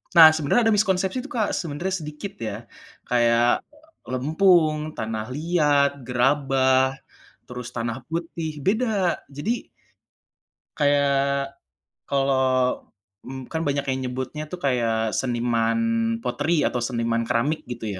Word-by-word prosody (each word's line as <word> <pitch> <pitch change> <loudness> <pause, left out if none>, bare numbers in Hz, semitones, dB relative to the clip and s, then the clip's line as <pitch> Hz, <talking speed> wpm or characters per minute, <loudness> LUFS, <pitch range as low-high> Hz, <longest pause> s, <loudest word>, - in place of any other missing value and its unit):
Nah, 165 -2 +11
sebenarnya 155 +10 +2
ada 220 - +4
miskonsepsi 190 +2 +1
tuh 290 - -10
Kak, 215 -3 +1
sebenarnya 170 +4 -3
sedikit 150 +6 -7 0.2
ya, 105 - -3 0.6
kayak, 120 0 +3 0.5
lempung, 155 +4 +3 0.2
tanah 110 0 -3
liat, 150 -3 +2 0.2
gerabah, 130 +1 +3 0.6
terus 125 0 -7
tanah 115 -1 -2
putih, 165 -1 -4
beda. 205 -4 +1
Jadi 180 - -3 1.1
kayak, 140 -1 +1 0.5
kalau, 130 -2 +1 0.4
m 130 -1 -8
kan 160 0 -3
banyak 140 -1 0
yang 130 0 -1
nyebutnya 130 +4 -4
tuh 180 - -5
kayak 115 -5 0
seniman 120 - 0 0.4
pottery, 160 -4 0
atau 125 - -1
seniman 115 -1 -1
keramik, 140 +8 0
gitu 120 -3 -6
140 Hz, 115 wpm, -24 LUFS, 125-160 Hz, 1.1 s, Nah